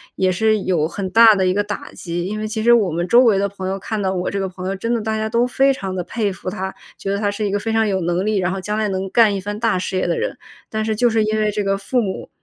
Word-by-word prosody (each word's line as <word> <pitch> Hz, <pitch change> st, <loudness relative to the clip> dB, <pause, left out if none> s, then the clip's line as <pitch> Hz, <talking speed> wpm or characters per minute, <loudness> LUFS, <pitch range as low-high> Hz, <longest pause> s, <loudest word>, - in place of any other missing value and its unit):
也 185 Hz, -1 st, +2 dB
是 215 Hz, +3 st, +2 dB
有 160 Hz, -4 st, +1 dB
很 190 Hz, +2 st, -4 dB
大 225 Hz, +2 st, +7 dB
的 190 Hz, -1 st, +1 dB
一 185 Hz, -, +2 dB
个 205 Hz, -, +1 dB
打 205 Hz, 0 st, -6 dB
击。 175 Hz, -1 st, -4 dB
因 210 Hz, +3 st, -3 dB
为 215 Hz, -, -3 dB
其 215 Hz, 0 st, -3 dB
实 235 Hz, -, +5 dB
我 215 Hz, -6 st, +3 dB
们 170 Hz, +2 st, -1 dB
周 240 Hz, +7 st, +6 dB
围 215 Hz, -4 st, +4 dB
的 200 Hz, -, +1 dB
朋 190 Hz, -1 st, -6 dB
友 190 Hz, +1 st, -2 dB
看 215 Hz, +2 st, -3 dB
到 190 Hz, -1 st, 0 dB
我 180 Hz, -1 st, -2 dB
这 200 Hz, -, -2 dB
个 195 Hz, -, -1 dB
朋 185 Hz, 0 st, -7 dB
友， 195 Hz, -, -2 dB
真 230 Hz, +5 st, -2 dB
的 235 Hz, -, 0 dB
大 220 Hz, 0 st, -2 dB
家 220 Hz, 0 st, -1 dB
都 235 Hz, +2 st, +2 dB
非 270 Hz, +2 st, +3 dB
常 195 Hz, -6 st, -5 dB
地 185 Hz, -, -1 dB
佩 215 Hz, -2 st, -1 dB
服 185 Hz, 0 st, -6 dB
他， 190 Hz, +1 st, -4 dB, 0.2 s
觉 195 Hz, -, -4 dB
得 200 Hz, -, 0 dB
他 205 Hz, 0 st, 0 dB
是 210 Hz, +1 st, -3 dB
一 200 Hz, -, -1 dB
个 205 Hz, -, 0 dB
非 225 Hz, +2 st, -3 dB
常 225 Hz, 0 st, +3 dB
有 190 Hz, -2 st, 0 dB
能 175 Hz, +2 st, 0 dB
力， 215 Hz, -1 st, +1 dB
然 180 Hz, -1 st, +1 dB
后 195 Hz, -, -3 dB
将 210 Hz, +2 st, -3 dB
来 215 Hz, -1 st, 0 dB
能 190 Hz, 0 st, -3 dB
干 220 Hz, 0 st, +4 dB
一 -, -, -2 dB
番 205 Hz, +2 st, -5 dB
大 225 Hz, -3 st, +1 dB
事 185 Hz, +1 st, -3 dB
业 -, -, 0 dB
的 170 Hz, -, 0 dB
人， -, -, -3 dB, 0.3 s
但 220 Hz, 0 st, -2 dB
是 220 Hz, 0 st, 0 dB
就 240 Hz, +3 st, +3 dB
是 220 Hz, -1 st, +2 dB
因 215 Hz, 0 st, 0 dB
为 215 Hz, -1 st, +1 dB
这 210 Hz, -, -2 dB
个 195 Hz, 0 st, 0 dB
父 245 Hz, +5 st, -1 dB
母， 195 Hz, -4 st, -4 dB
205 Hz, 355 characters per minute, -20 LUFS, 190-220 Hz, 0.3 s, 大